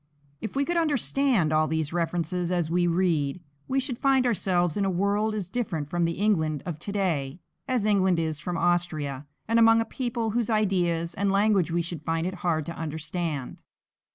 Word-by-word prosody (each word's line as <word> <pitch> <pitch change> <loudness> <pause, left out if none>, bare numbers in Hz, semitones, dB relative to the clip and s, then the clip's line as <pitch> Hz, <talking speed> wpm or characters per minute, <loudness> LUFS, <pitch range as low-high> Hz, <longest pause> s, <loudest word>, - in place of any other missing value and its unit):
If 220 +1 -5
we 280 +1 +1
could 345 +2 -1
understand 275 - +2
all 155 0 +3
these 160 -1 -1
references 175 +1 -1
as 170 -3 0
we 175 0 +2
read, 170 -4 +1 0.3
we 270 +1 +1
should 260 -2 -3
find 270 -2 +3
ourselves 180 -7 +1
in 205 - 0
a 195 - +1
world 200 +4 0
as 200 -5 -3
different 180 -10 -3
from 175 -1 +1
the 165 - 0
England 160 -7 0
of 170 -4 -5
to 200 - -5
day 170 -7 -1 0.3
as 250 -5 0
England 190 -4 +3
is 160 -2 -1
from 175 +1 -3
Austria, 155 -6 -1 0.2
and 230 +1 +3
among 225 0 +6
a 225 - 0
people 235 -3 -2
whose 235 0 0
ideas 175 -6 +1
and 200 +2 0
language 200 -3 +3
we 170 +1 0
should 170 -2 -6
find 165 +1 -1
it 185 - -2
hard 160 -4 0
to 170 - -6
understand. 160 -2 -4
175 Hz, 190 wpm, -26 LUFS, 165-215 Hz, 0.3 s, among